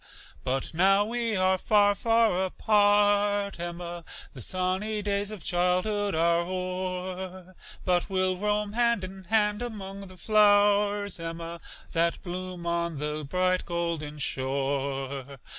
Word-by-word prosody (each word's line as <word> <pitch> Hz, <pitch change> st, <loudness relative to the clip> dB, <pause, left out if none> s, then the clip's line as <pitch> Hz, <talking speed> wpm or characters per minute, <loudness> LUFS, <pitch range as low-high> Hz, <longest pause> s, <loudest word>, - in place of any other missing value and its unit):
But 130 Hz, +4 st, -2 dB
now 195 Hz, +4 st, +4 dB
we 230 Hz, 0 st, -1 dB
are 185 Hz, 0 st, +2 dB
far, 205 Hz, 0 st, +4 dB
far 225 Hz, -3 st, +2 dB
apart, 205 Hz, 0 st, +2 dB
Emma, 175 Hz, 0 st, -5 dB, 0.3 s
The 130 Hz, -, -9 dB
sunny 185 Hz, -, -1 dB
days 200 Hz, 0 st, 0 dB
of 215 Hz, -5 st, -7 dB
childhood 185 Hz, +3 st, +1 dB
are 170 Hz, +1 st, +3 dB
o'er, 185 Hz, 0 st, -4 dB, 0.3 s
But 180 Hz, +1 st, +1 dB
we'll 185 Hz, -1 st, +1 dB
roam 210 Hz, +1 st, -1 dB
hand 235 Hz, -3 st, +2 dB
in 190 Hz, 0 st, -8 dB
hand 210 Hz, +1 st, +2 dB
'mong 200 Hz, -4 st, -6 dB
the 185 Hz, 0 st, -13 dB
flowers, 205 Hz, -1 st, +3 dB
Emma, 165 Hz, 0 st, -6 dB, 0.3 s
That 170 Hz, 0 st, 0 dB
bloom 180 Hz, -1 st, -6 dB
on 170 Hz, -2 st, -1 dB
the 150 Hz, +1 st, -3 dB
Bright 185 Hz, +5 st, +1 dB
Golden 170 Hz, -3 st, -3 dB
Shore. 135 Hz, 0 st, -2 dB
185 Hz, 125 wpm, -27 LUFS, 170-205 Hz, 0.3 s, now